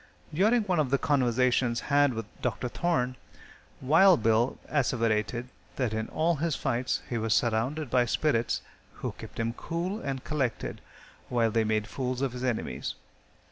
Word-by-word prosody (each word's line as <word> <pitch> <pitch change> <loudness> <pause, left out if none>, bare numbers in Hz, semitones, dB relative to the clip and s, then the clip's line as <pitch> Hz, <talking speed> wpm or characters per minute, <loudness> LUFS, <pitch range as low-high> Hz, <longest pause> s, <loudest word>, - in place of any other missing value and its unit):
During 215 +8 +3
one 185 -5 0
of 145 -4 +1
the 140 - +3
conversations 125 -4 +2
had 145 -3 +3
with 115 -1 -3 0.2
Dr. 125 0 -1
Thorne, 130 -6 0 0.6
Wild 165 - +5
Bill 115 +3 +2
asseverated 120 -3 0 0.3
that 125 -5 -1
in 110 0 -2
all 165 +1 +1
his 160 0 0
fights 125 -2 -1
he 120 - -2
was 110 -1 +1
surrounded 125 +5 0
by 125 -1 +4
spirits, 120 0 0 0.3
who - - -4
kept - - -11
him 115 0 0
cool 175 - -3
and 135 -2 -4
collected 130 -7 -2 0.5
while 115 -2 +2
they 115 +1 +2
made 110 -1 0
fools 130 +1 -3
of 135 - 0
his 125 0 -6
enemies. 120 -3 -2
125 Hz, 155 wpm, -28 LUFS, 115-150 Hz, 0.6 s, Wild